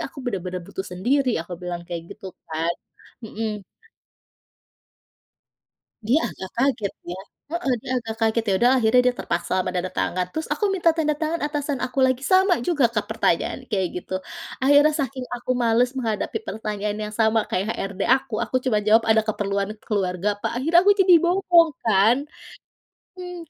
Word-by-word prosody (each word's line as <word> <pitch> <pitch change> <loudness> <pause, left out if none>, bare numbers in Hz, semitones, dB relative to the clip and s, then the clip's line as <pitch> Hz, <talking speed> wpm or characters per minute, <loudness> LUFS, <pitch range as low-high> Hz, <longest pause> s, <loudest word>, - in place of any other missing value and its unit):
aku 280 - -14
bener-bener 185 -6 -3
butuh 190 +3 -6
sendiri" 255 +8 +1
aku 175 - -11
bilang 175 -1 -5
kayak 170 -1 -5
gitu 195 - -10 0.2
kan, 160 +2 -1 0.5
mhm. 215 -2 -4 2.4
Dia 235 +8 +3
agak 190 - -8
kaget 240 -6 +1 0.2
ya, 185 - -7 0.3
heeh, 340 -6 0
dia - - -7
agak 225 -1 -6
kaget 225 0 +1
ya - - +3
udah 245 +4 +4
akhirnya 225 +2 +4
dia 250 - +3
terpaksa - - -2
menanda 180 0 -3
tangan 180 0 -1
terus 315 0 -4
aku - - -1
minta 345 -3 +3
tanda 305 -2 +1
tangan 320 +2 -1
atasan 290 -2 -2
aku 255 +2 -6
lagi 260 +1 -1
sama 375 +2 +4
juga 290 -7 +2
Kak 210 -3 -1
pertanyaan 220 -1 0
kayak 190 -3 0
gitu - - -7 0.5
akhirnya 290 +2 +6
saking 265 -1 -3
aku 245 +1 -7
males 235 +2 +3
menghadapi 230 - -2
pertanyaan 210 -1 -3
yang 210 - -6
sama 220 0 +3
kayak 185 +2 -1
HRD 195 0 -5 0.2
aku 265 -4 -8
aku 255 - -2
cuma 235 -5 +2
jawab, 220 +2 +5
"Ada 220 0 +4
keperluan 200 -2 -1 0.2
keluarga 190 -3 -1
Pak" - - -2
akhirnya 325 +7 +4
aku 405 +2 +6
jadi 370 -2 +7
bohong 345 -2 +4
kan, 220 +2 +4 1.0
mmm. 360 -1 -7
225 Hz, 160 wpm, -23 LUFS, 200-280 Hz, 2.4 s, jadi